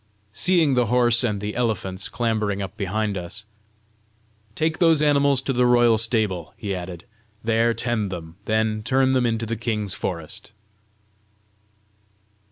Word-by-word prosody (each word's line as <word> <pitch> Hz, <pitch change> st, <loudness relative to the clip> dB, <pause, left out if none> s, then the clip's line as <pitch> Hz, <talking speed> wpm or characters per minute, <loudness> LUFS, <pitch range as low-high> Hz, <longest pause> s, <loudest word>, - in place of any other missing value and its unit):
Seeing 165 Hz, -, +3 dB
the 125 Hz, -2 st, +2 dB
horse 120 Hz, +1 st, +3 dB
and 105 Hz, -4 st, 0 dB
the 105 Hz, +1 st, -4 dB
elephants 105 Hz, -6 st, -2 dB
clambering 110 Hz, -4 st, -1 dB
up 95 Hz, 0 st, -5 dB
behind 105 Hz, 0 st, -2 dB
us 95 Hz, +5 st, -7 dB, 1.1 s
"Take 160 Hz, +1 st, -1 dB
those 165 Hz, -3 st, +4 dB
animals 140 Hz, -2 st, +3 dB
to 135 Hz, -, -1 dB
the 125 Hz, 0 st, +3 dB
royal 120 Hz, -2 st, +4 dB
stables," 105 Hz, -8 st, 0 dB
he 100 Hz, -2 st, -4 dB
added; 90 Hz, -1 st, -7 dB, 0.4 s
"there 115 Hz, +1 st, +2 dB
tend 110 Hz, -5 st, -1 dB
them; 85 Hz, -2 st, -8 dB
then 110 Hz, 0 st, 0 dB
turn 130 Hz, +3 st, +2 dB
them 125 Hz, -2 st, +2 dB
into 115 Hz, 0 st, -1 dB
the 115 Hz, +1 st, -3 dB
king's 110 Hz, -3 st, -3 dB
forest." 85 Hz, +4 st, -5 dB
110 Hz, 140 wpm, -23 LUFS, 100-125 Hz, 1.1 s, those